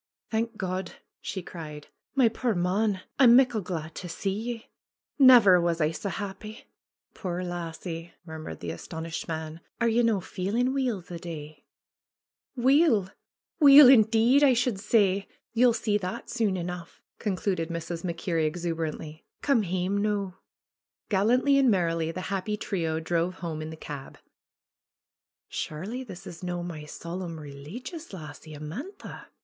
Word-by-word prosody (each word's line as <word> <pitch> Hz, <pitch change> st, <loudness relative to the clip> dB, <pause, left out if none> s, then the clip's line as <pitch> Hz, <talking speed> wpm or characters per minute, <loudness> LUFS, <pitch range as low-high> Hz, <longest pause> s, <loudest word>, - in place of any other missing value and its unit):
^^Thank 225 Hz, 0 st, -1 dB
God 185 Hz, -1 st, -3 dB
!" -, -, -59 dB
she 190 Hz, -, -4 dB
cried. 150 Hz, -4 st, -9 dB, 0.3 s
^^My 235 Hz, -4 st, +5 dB
puir 235 Hz, -2 st, 0 dB
mon! 190 Hz, +3 st, +1 dB, 0.2 s
I'm 240 Hz, -3 st, +8 dB
muckle 250 Hz, -4 st, +4 dB
glad 165 Hz, -4 st, -5 dB
to 180 Hz, -, -7 dB
see 195 Hz, +3 st, -2 dB
ye. 230 Hz, +2 st, -5 dB, 0.5 s
Never 235 Hz, -9 st, +8 dB
was 170 Hz, -1 st, 0 dB
I 155 Hz, -1 st, +2 dB
sae 200 Hz, +5 st, -4 dB
happy 205 Hz, +4 st, -6 dB, 0.3 s
!" -, -, -55 dB
'Tuire 180 Hz, -2 st, -4 dB
lassie!" 170 Hz, -1 st, -5 dB
murmured 160 Hz, -, -8 dB
the 85 Hz, -, -4 dB
astonished 160 Hz, -, -6 dB
man. 160 Hz, 0 st, -5 dB, 0.2 s
'^Are 235 Hz, -1 st, +2 dB
ye 240 Hz, -, +4 dB
no' 225 Hz, -4 st, +2 dB
feelin' 215 Hz, +9 st, -1 dB
weel 250 Hz, -8 st, 0 dB
the 175 Hz, -1 st, -8 dB
day 155 Hz, -3 st, -8 dB, 0.5 s
?" -, -, -47 dB
^^Weell 250 Hz, -, +4 dB, 0.5 s
Weel, 285 Hz, -2 st, +10 dB
indeed, 230 Hz, +3 st, +5 dB
I 270 Hz, -3 st, +6 dB
should 245 Hz, -4 st, 0 dB
say! 200 Hz, -2 st, +2 dB, 0.3 s
Ye'll 245 Hz, +1 st, +5 dB
see 215 Hz, -2 st, 0 dB
that 200 Hz, +5 st, -5 dB
soon 220 Hz, -6 st, +1 dB
enough," 175 Hz, -1 st, -6 dB, 0.2 s
concluded 185 Hz, -4 st, -1 dB
Mrs. 165 Hz, 0 st, -4 dB
MacKerrie 165 Hz, -2 st, -1 dB
exuberantly. 160 Hz, -2 st, -4 dB, 0.2 s
^^Come 275 Hz, -6 st, +3 dB
hame 185 Hz, +2 st, -1 dB
noo." 200 Hz, -2 st, -1 dB, 0.8 s
Gallantly 250 Hz, +8 st, +3 dB
and 265 Hz, -2 st, +5 dB
merrily 165 Hz, -5 st, +1 dB
the 185 Hz, -, -5 dB
happy 205 Hz, +2 st, -2 dB
trio 165 Hz, -7 st, -2 dB
drove 170 Hz, +2 st, -1 dB
home 165 Hz, -4 st, -5 dB
in 155 Hz, -, -5 dB
the 160 Hz, -, -8 dB
cab. 140 Hz, -3 st, -8 dB, 1.3 s
Surely 205 Hz, +12 st, -4 dB
this 190 Hz, -8 st, -10 dB
is 170 Hz, -, -9 dB
no' 175 Hz, -1 st, -3 dB
my 160 Hz, -4 st, -6 dB
solemn, 170 Hz, +1 st, -6 dB
releegious 180 Hz, -, -8 dB
lassie, 155 Hz, -2 st, -9 dB
Amantha 175 Hz, -, -8 dB
185 Hz, 145 wpm, -27 LUFS, 165-225 Hz, 1.3 s, Weel